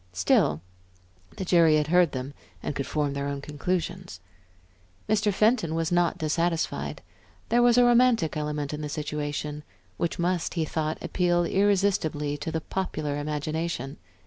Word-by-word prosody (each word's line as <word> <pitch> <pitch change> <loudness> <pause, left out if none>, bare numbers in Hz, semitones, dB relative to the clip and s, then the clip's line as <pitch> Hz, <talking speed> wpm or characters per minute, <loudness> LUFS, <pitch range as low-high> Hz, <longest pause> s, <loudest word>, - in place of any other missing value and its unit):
Still, 90 -4 +2 0.8
the 190 - -3
jury 170 -3 +5
had 150 -1 +2
heard 175 -2 +4
them 130 +2 -5 0.3
and - - -2
could 140 - -3
form 145 -2 -1
their 140 0 -3
own 140 0 -3
conclusions. 175 - -3 0.9
Mr. 210 -1 +2
Fenton 205 -5 +2
was 165 0 -1
not 175 +2 +2
dissatisfied; 165 +1 -1 0.5
there 240 - +4
was 240 0 +5
a 245 - +7
romantic 240 - +4
element 150 -1 -3
in 150 - -4
the 150 - -4
situation 150 0 -4 0.4
which 170 - -2
must, 175 0 -1
he 165 -2 0
thought, 155 0 -2
appeal 175 -1 +1
irresistibly 185 -7 +1
to 155 +3 -4
the 160 - -2
popular 155 -6 -3
imagination. 150 0 -3
160 Hz, 145 wpm, -26 LUFS, 150-180 Hz, 0.9 s, a